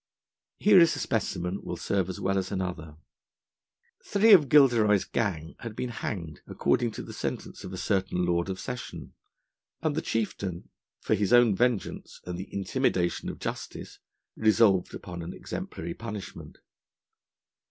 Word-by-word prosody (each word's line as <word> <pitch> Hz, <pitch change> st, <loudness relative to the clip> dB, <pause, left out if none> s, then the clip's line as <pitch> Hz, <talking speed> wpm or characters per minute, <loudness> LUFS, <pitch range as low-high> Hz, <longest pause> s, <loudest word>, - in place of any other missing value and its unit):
Here 205 Hz, -2 st, +6 dB
is 170 Hz, -1 st, +5 dB
a -, -, -5 dB
specimen 95 Hz, -4 st, -2 dB
will -, -, -5 dB
serve 95 Hz, -2 st, -1 dB
as 95 Hz, -, -5 dB
well 95 Hz, +1 st, 0 dB
as 95 Hz, 0 st, -4 dB
another: 90 Hz, -5 st, -4 dB, 1.1 s
three 210 Hz, +2 st, +5 dB
of 150 Hz, -9 st, +7 dB
Gilderoy's 115 Hz, -9 st, +5 dB
gang 85 Hz, -8 st, -2 dB
had 115 Hz, -2 st, -7 dB
been 125 Hz, -, -3 dB
hanged 85 Hz, -9 st, -5 dB
according 120 Hz, -1 st, +1 dB
to -, -, -6 dB
the -, -, -9 dB
sentence -, -, -5 dB
of -, -, -7 dB
a 95 Hz, -, -6 dB
certain 95 Hz, -2 st, 0 dB
Lord 85 Hz, +1 st, 0 dB
of 95 Hz, -, -4 dB
Session, 125 Hz, 0 st, -7 dB, 0.7 s
and 155 Hz, -2 st, 0 dB
the 160 Hz, -, -1 dB
Chieftain, 100 Hz, -5 st, -3 dB, 0.3 s
for -, -, 0 dB
his 100 Hz, -1 st, +1 dB
own 120 Hz, -4 st, +6 dB
vengeance 120 Hz, -1 st, -1 dB
and 90 Hz, -, -4 dB
the 95 Hz, +3 st, -7 dB
intimidation 95 Hz, -2 st, 0 dB
of -, -, -6 dB
justice, -, -, -6 dB, 0.4 s
resolved 110 Hz, -4 st, +3 dB
upon 85 Hz, -1 st, -7 dB
an 85 Hz, +2 st, -6 dB
exemplary 85 Hz, -, -6 dB
punishment. 105 Hz, -4 st, -8 dB
100 Hz, 150 wpm, -28 LUFS, 90-115 Hz, 1.1 s, of